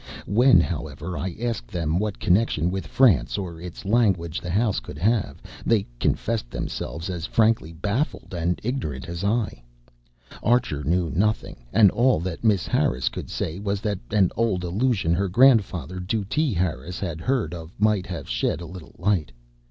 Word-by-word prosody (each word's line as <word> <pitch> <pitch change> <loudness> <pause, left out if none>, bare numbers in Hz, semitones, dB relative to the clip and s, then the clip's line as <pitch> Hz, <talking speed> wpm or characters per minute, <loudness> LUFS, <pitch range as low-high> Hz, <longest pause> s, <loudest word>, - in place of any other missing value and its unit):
When, 120 +2 +5
however, 80 0 -3
I 90 -1 -3
asked 120 -1 -2
them 85 -1 -1
what 105 -2 -2
connection 90 -3 +2
with 95 0 -4
France 75 - +3
or 85 -4 -5
its 90 +2 -8
language 95 -7 +1
the 90 - -6
house 105 - +1
could - - -10
have, 105 +6 0 0.2
they 110 -4 +2
confessed 110 - 0
themselves 80 +6 -4
as 90 -3 -4
frankly 110 -7 +2
baffled 100 - -2
and 85 +1 -1
ignorant 105 - -3
as 85 +2 -5
I. 105 - 0 0.8
Archer 120 - +1
knew 85 +2 +1
nothing, 95 - -1
and 105 -4 +6
all 125 -5 +3
that 90 +2 -5
Miss 105 -5 +3
Harris 65 0 +1
could - - -7
say 80 +4 -3
was 100 0 -1
that 105 -4 -2
an 100 -4 +3
old 105 -5 0
allusion 95 -1 +1
her 95 +2 0
grandfather, 95 -5 +3
Dutee 110 - -1
Harris, 85 -1 -2
had 85 -5 -4
heard 130 -2 0
of 80 -1 -8
might 105 -3 +2
have 85 -3 -6
shed - - -1
a 85 - -7
little 90 -1 -11
light. 85 -8 0
95 Hz, 165 wpm, -24 LUFS, 85-110 Hz, 0.8 s, and